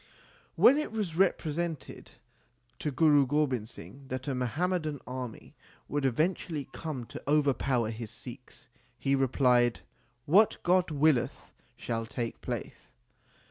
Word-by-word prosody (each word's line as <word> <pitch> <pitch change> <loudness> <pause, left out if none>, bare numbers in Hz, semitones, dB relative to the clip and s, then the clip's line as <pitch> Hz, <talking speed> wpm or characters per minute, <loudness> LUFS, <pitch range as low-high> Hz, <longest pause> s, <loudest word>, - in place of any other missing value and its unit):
When 280 +4 +6
it 305 - -3
was 205 -7 -3
represented 170 -4 -1 0.7
to 150 - -1
Guru 145 -1 +4
Gobind 130 -6 0
Singh 135 +3 -10
that 130 +1 -5
a 140 - 0
Muhammadan 155 +4 -1
army 125 -3 -7 0.3
would 145 -1 -1
eventually 155 +2 0
come 150 -7 -5
to - - -9
overpower 135 -5 +2
his 115 -1 -6
Sikhs, 125 +3 -11 0.3
he 135 +1 0
replied, 125 -3 +3 0.4
What 200 +8 +5
God 180 0 +3
willeth 150 -4 +1 0.3
shall 115 -1 -3
take 115 0 -4
place. - - -4
140 Hz, 120 wpm, -30 LUFS, 125-160 Hz, 0.7 s, When